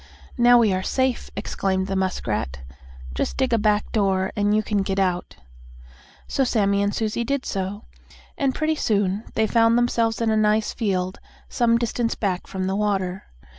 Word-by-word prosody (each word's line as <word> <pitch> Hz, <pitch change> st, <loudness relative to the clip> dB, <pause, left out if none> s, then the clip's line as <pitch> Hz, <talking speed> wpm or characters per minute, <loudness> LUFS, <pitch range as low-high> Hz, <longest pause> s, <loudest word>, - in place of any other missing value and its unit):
"Now 245 Hz, 0 st, +6 dB
we 220 Hz, -5 st, +4 dB
are 185 Hz, -, 0 dB
safe!" 260 Hz, +5 st, -1 dB
exclaimed 190 Hz, -1 st, -1 dB
the 195 Hz, 0 st, -3 dB
muskrat. 105 Hz, -, -2 dB, 0.5 s
"Just -, -, -2 dB
dig 260 Hz, -2 st, +1 dB
a 230 Hz, -, +3 dB
back 210 Hz, 0 st, +1 dB
door 190 Hz, -3 st, +1 dB
and 205 Hz, -1 st, +2 dB
you 215 Hz, -, +2 dB
can 205 Hz, -1 st, 0 dB
get 195 Hz, 0 st, -2 dB
out." 180 Hz, -2 st, -1 dB, 0.9 s
So 270 Hz, -, +1 dB
Sammie 200 Hz, -5 st, +2 dB
and 200 Hz, 0 st, +1 dB
Susie 220 Hz, +2 st, -1 dB
did 280 Hz, +3 st, -2 dB
so, 195 Hz, +3 st, -4 dB, 0.5 s
and, 270 Hz, -2 st, 0 dB
pretty 315 Hz, 0 st, +1 dB
soon, 205 Hz, -7 st, 0 dB
they 220 Hz, -, +3 dB
found 230 Hz, +1 st, +3 dB
themselves 230 Hz, -2 st, +1 dB
in 230 Hz, -1 st, +1 dB
a -, -, +2 dB
nice 215 Hz, 0 st, +2 dB
field, 185 Hz, -5 st, -2 dB, 0.3 s
some 230 Hz, -1 st, +2 dB
distance 235 Hz, 0 st, -1 dB
back 190 Hz, -4 st, -2 dB
from 190 Hz, -1 st, -3 dB
the 190 Hz, +1 st, -1 dB
water. 195 Hz, -3 st, -1 dB
210 Hz, 170 wpm, -23 LUFS, 190-230 Hz, 0.9 s, Now